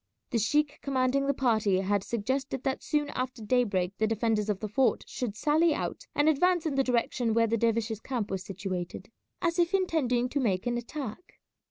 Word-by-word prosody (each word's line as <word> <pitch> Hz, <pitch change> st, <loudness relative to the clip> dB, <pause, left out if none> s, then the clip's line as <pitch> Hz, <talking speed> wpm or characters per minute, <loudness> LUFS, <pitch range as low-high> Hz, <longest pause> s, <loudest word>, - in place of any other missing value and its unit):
The 230 Hz, -, +2 dB
sheik 295 Hz, +6 st, +1 dB
commanding 270 Hz, 0 st, +1 dB
the 280 Hz, -, +3 dB
party 220 Hz, -7 st, +2 dB
had 200 Hz, 0 st, 0 dB
suggested 260 Hz, +4 st, -2 dB
that 265 Hz, -1 st, -1 dB
soon 295 Hz, -1 st, 0 dB
after 255 Hz, -2 st, -4 dB
daybreak 205 Hz, -6 st, +1 dB
the 220 Hz, -, +3 dB
defenders 220 Hz, -1 st, 0 dB
of 205 Hz, -2 st, 0 dB
the 215 Hz, -, -3 dB
fort 250 Hz, +5 st, +2 dB
should 235 Hz, -5 st, -4 dB
sally 305 Hz, +6 st, +3 dB
out -, -, -4 dB
and 290 Hz, +1 st, +3 dB
advance 345 Hz, +3 st, +3 dB
in 310 Hz, -, 0 dB
the 270 Hz, 0 st, +2 dB
direction 240 Hz, -2 st, 0 dB
where 230 Hz, 0 st, +4 dB
the 230 Hz, 0 st, +1 dB
dervishes' 230 Hz, -1 st, 0 dB
camp 230 Hz, -4 st, -3 dB
was 190 Hz, -1 st, -2 dB
situated, 185 Hz, +1 st, -5 dB, 0.3 s
as 340 Hz, 0 st, +1 dB
if 345 Hz, +3 st, +3 dB
intending 275 Hz, -10 st, +1 dB
to 285 Hz, -, -1 dB
make 195 Hz, -8 st, 0 dB
an 240 Hz, 0 st, 0 dB
attack. 260 Hz, +4 st, -7 dB
240 Hz, 190 wpm, -29 LUFS, 215-275 Hz, 0.3 s, where